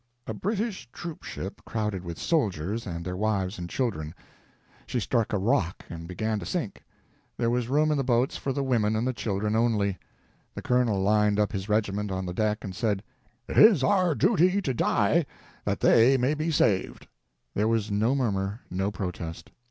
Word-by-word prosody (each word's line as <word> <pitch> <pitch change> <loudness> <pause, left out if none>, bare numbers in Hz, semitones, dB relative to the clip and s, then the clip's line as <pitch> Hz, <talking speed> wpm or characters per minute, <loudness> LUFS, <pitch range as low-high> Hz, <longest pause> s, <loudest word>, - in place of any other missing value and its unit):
A 110 - -4
British 200 - -3
troop 170 -3 -7
ship 95 - -7
crowded 105 -4 -3
with 85 -2 -6
soldiers 105 - -1
and 85 -2 -5
their 90 0 -3
wives 100 -2 -1
and 85 -1 -5
children. 80 - -2 0.7
She 125 - -1
struck 115 0 0
a 105 - +1
rock 95 -3 0
and 85 -1 -7
began 110 +4 -2
to - - -7
sink. 165 - -3 0.5
There 115 - +1
was 120 -1 0
room 155 +3 +3
in 150 - +1
the - - +1
boats 125 0 +1
for 135 - -2
the 140 +1 -1
women 110 -5 +1
and 125 +3 0
children 105 0 -1
only. 105 -4 +1 0.6
The - - -6
colonel 125 -5 +2
lined 105 +1 +3
up 105 +2 +2
his 100 -1 -4
regiment 105 -1 0
on 95 0 -2
the 90 - -4
deck 105 +2 0
and 95 -2 -6
said 105 -2 0 0.4
"it - - +1
is 205 - +7
our 185 -2 +3
duty 185 - +3
to 130 - 0
die, 125 +7 +2 0.4
that - - -1
they 125 +4 +6
may 130 +3 +2
be 155 +2 -2
saved." 105 - +1 0.5
There 105 +2 +1
was 110 -2 0
no 110 +6 +2
murmur, 100 -4 -1
no 95 +2 0
protest. 90 -4 -6
110 Hz, 185 wpm, -27 LUFS, 95-130 Hz, 0.7 s, is